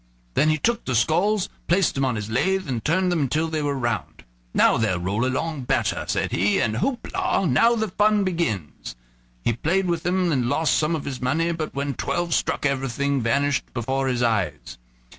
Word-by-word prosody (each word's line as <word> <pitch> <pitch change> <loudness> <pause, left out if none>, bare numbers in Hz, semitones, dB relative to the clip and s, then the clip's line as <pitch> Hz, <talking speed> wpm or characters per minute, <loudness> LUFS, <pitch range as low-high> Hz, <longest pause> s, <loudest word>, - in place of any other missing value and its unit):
Then 155 - +3
he 155 - +2
took 230 +10 0
the 130 - -1
skulls, 180 - +2 0.2
placed 185 +1 +2
them 135 0 0
on 125 -2 0
his 105 -1 -4
lathe, 190 +9 +1
and 120 -4 -3
turned 180 +3 +1
them 150 -7 0
till 160 +4 0
they 155 -1 -2
were 145 -1 -1
round. 120 -3 -3 0.3
"Now - - +4
they'll 105 -5 +1
roll 100 +6 -1
along 140 +1 -2
better," - - 0
said - - -1
he, 100 +4 +2
"and 110 -1 0
houp 250 +1 -2
la! - - +1
now 230 - +4
the 220 -2 -1
fun 210 +2 +2
begins." 110 - -3 0.5
He 120 - +1
played 175 - 0
with 170 -2 -1
them 180 0 +1
and 125 -5 +1
lost 160 +3 +2
some 155 +2 +1
of 150 - -5
his 130 -3 -5
money, 160 +7 +1
but 160 -3 -4
when 140 0 -2
twelve 175 +6 -2
struck - - 0
everything 140 0 0
vanished 135 +3 0
before 130 +3 -1
his 125 -2 0
eyes. 110 - -1
145 Hz, 200 wpm, -23 LUFS, 125-175 Hz, 0.5 s, Now